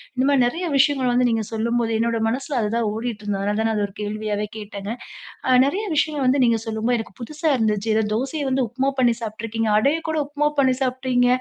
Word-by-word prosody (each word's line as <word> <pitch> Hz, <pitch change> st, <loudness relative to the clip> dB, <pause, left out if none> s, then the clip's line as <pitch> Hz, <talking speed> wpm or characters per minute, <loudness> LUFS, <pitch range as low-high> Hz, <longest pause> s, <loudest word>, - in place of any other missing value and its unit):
இந்த 255 Hz, +1 st, +1 dB
மாரி 275 Hz, -3 st, +4 dB
நெறைய 340 Hz, +8 st, -3 dB
விஷயங்கள 270 Hz, -2 st, +3 dB
வந்து 245 Hz, 0 st, +3 dB
நீங்க 225 Hz, -2 st, 0 dB
சொல்லும்போது, 230 Hz, +1 st, 0 dB
என்னோட 230 Hz, 0 st, +1 dB
மனசுல 265 Hz, +2 st, -2 dB
அதுதான் 225 Hz, +1 st, 0 dB
ஓடிட்டு 225 Hz, -1 st, -4 dB
இருந்தது. 200 Hz, -1 st, -1 dB
அதனால 205 Hz, +1 st, 0 dB
தான் 225 Hz, -, +2 dB
நான் 220 Hz, -, 0 dB
அத 205 Hz, -, +1 dB
ஒரு 195 Hz, -, -18 dB
கேள்வியாவே 210 Hz, 0 st, -2 dB
கேட்டங்க. 205 Hz, -1 st, -6 dB, 0.6 s
அ, -, -, +1 dB
நெறைய 380 Hz, +11 st, 0 dB
விஷயங்கள் 295 Hz, -2 st, +1 dB
வந்து 260 Hz, +2 st, +3 dB
நீங்க 230 Hz, -1 st, +3 dB
சொல்லும்போது, 225 Hz, +2 st, 0 dB
எனக்கு 220 Hz, -, -7 dB
புதுசா 305 Hz, +6 st, -4 dB
இருந்துச்சு. 215 Hz, -2 st, 0 dB
ஏதோ 220 Hz, -, +3 dB
தோசைய 275 Hz, +5 st, -2 dB
வந்து, 265 Hz, 0 st, +1 dB
உப்மா 265 Hz, +3 st, 0 dB
பண்ணி 245 Hz, -2 st, +4 dB
சாப்பிட்டுருக்கீங்க. 225 Hz, 0 st, -3 dB
அடைய 280 Hz, +9 st, +3 dB
கூட 315 Hz, 0 st, -1 dB
உப்மா 295 Hz, +1 st, 0 dB
பண்ணி 260 Hz, -2 st, +4 dB
சாப்ட்டீங்க. 255 Hz, -1 st, +1 dB
235 Hz, 205 wpm, -22 LUFS, 220-270 Hz, 0.6 s, மாரி